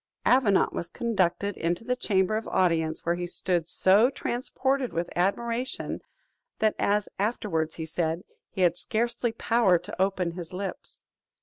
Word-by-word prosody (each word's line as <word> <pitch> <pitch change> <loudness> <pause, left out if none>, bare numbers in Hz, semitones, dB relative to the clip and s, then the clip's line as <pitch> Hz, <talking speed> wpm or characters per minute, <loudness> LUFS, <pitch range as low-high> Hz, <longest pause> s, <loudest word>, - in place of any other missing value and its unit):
Avenant 235 -7 +4
was 170 - -4
conducted 200 -3 0
into 170 +6 -1
the 250 +2 0
chamber 200 -4 +1
of 220 - -3
audience, 165 -4 +1
were 170 - +2
he 175 0 -3
stood 175 -1 -1
so 205 +6 +5
transported 265 0 -1
with 170 +1 -2
admiration, 235 +7 -1 0.6
that, 215 -1 +2
as 205 0 +2
he - - -16
afterwards 170 -8 -1
said, 165 +1 -1 0.3
he 190 - -4
had 175 -2 +4
scarcely 235 +1 -1
power 225 -4 +3
to 180 +2 -6
open 190 -3 +1
his 170 0 -8
lips. 190 +1 -5
195 Hz, 145 wpm, -27 LUFS, 175-230 Hz, 0.6 s, so